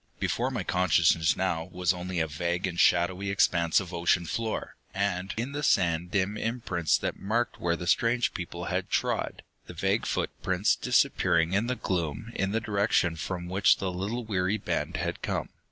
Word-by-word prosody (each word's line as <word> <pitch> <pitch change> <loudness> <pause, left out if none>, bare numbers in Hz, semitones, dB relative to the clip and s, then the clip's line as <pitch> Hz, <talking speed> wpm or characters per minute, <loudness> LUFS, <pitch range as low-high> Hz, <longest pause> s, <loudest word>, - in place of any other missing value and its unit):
Before 125 +2 0
my 120 -7 -3
consciousness 85 -3 +3
now 85 -3 -1
was 90 0 0
only 90 0 -4
a 80 - +2
vague 85 +4 -2
and 90 -2 -3
shadowy 90 +3 +3
expanse 85 -4 +3
of 90 -2 -7
ocean 85 +1 +2
floor, 110 +5 -3 0.2
and 95 -1 -1
in 120 +5 -2
the 145 +1 -3
sand 85 - +2
dim 100 +1 0
imprints 105 -9 0
that - - -4
marked 115 +5 -1
where 85 -1 +1
the 85 - -6
strange 115 +6 +2
people 90 -4 -6
had - - -2
trod, - - -1 0.2
the - - -9
vague - - 0
footprints 95 +2 0
disappearing 85 +1 +2
in 105 +4 +1
the 125 - 0
gloom 95 +2 -3
in 95 - 0
the 110 - +1
direction 100 -6 +1
from 85 +2 -4
which 95 +2 +3
the 95 -1 -2
little 105 +7 -3
weary 95 -1 0
band 85 -5 -2
had 85 +2 -3
come. - - -2
90 Hz, 175 wpm, -28 LUFS, 85-105 Hz, 0.2 s, consciousness